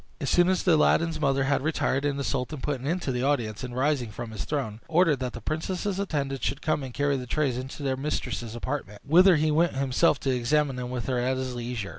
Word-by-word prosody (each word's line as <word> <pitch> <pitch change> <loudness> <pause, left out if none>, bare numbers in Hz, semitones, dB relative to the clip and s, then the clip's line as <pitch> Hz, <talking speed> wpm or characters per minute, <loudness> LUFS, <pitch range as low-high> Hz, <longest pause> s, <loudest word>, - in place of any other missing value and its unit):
As 140 - -1
soon 175 +1 +4
as 185 -1 +1
Aladdin's 165 0 +3
mother 135 -2 +2
had 135 0 +1
retired, 145 -2 0
the 140 -1 -1
sultan 135 +2 -2
put 140 0 -2
an 135 - -5
end 175 +3 -1
to 135 - -1
the 125 -1 -1
audience; 125 -5 0
and 125 -1 -6
rising 130 -3 +1
from 115 +2 -7
his 110 - -5
throne, 125 -8 -3
ordered 165 -2 +3
that 125 -1 -3
the 120 - -7
princess's 180 - -2
attendants 140 -8 -2
should 140 +2 -2
come 155 -2 +1
and 130 -2 -6
carry 145 +2 0
the 125 -1 -6
trays 140 -2 0
into 130 +3 -6
their 135 -1 0
mistress's 130 -5 -3
apartment, 120 -5 -5
whither 180 +4 +6
he 155 0 +2
went 165 0 +2
himself 135 +3 +2
to 135 -2 +1
examine 135 +3 +1
them 125 -1 -4
with 125 -3 -4
her 130 -2 0
at 130 +2 0
his 130 -1 -3
leisure. 120 -4 -4
135 Hz, 235 wpm, -27 LUFS, 125-150 Hz, -, whither